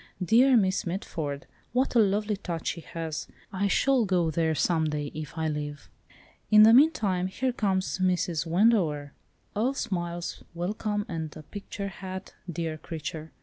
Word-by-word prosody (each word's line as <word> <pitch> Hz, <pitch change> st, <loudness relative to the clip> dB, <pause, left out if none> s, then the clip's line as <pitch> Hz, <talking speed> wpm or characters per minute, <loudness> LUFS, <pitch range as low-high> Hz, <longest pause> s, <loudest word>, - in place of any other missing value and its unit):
Dear 245 Hz, +6 st, +5 dB
Miss 190 Hz, -4 st, +1 dB
Mitford! 160 Hz, -6 st, -4 dB, 0.3 s
what 255 Hz, +2 st, +1 dB
a 240 Hz, -, +5 dB
lovely 210 Hz, 0 st, +2 dB
touch 170 Hz, -4 st, -4 dB
she 170 Hz, -, -4 dB
has! 160 Hz, -1 st, -5 dB, 0.3 s
I 195 Hz, +1 st, +1 dB
shall 260 Hz, +4 st, +3 dB
go 175 Hz, -4 st, +1 dB
there 160 Hz, 0 st, +1 dB
some 160 Hz, +1 st, +1 dB
day 150 Hz, -1 st, -3 dB
if 155 Hz, +1 st, -7 dB
I 160 Hz, 0 st, 0 dB
live. 145 Hz, -1 st, -5 dB, 0.6 s
In 215 Hz, 0 st, +8 dB
the 220 Hz, +1 st, +8 dB
meantime 220 Hz, -, +4 dB
here 255 Hz, +7 st, -1 dB
comes 190 Hz, -4 st, 0 dB
Mrs. 180 Hz, -3 st, +1 dB
Wendover, 165 Hz, -7 st, +2 dB, 0.4 s
all 245 Hz, +6 st, +1 dB
smiles, 175 Hz, -7 st, -3 dB
welcome, 205 Hz, +4 st, -2 dB
and 160 Hz, -3 st, -5 dB
a 155 Hz, -, -10 dB
picture 200 Hz, +3 st, -6 dB
hat, 190 Hz, 0 st, -7 dB, 0.2 s
dear 160 Hz, -1 st, -3 dB
creature! 160 Hz, 0 st, -6 dB
180 Hz, 150 wpm, -28 LUFS, 160-210 Hz, 0.6 s, In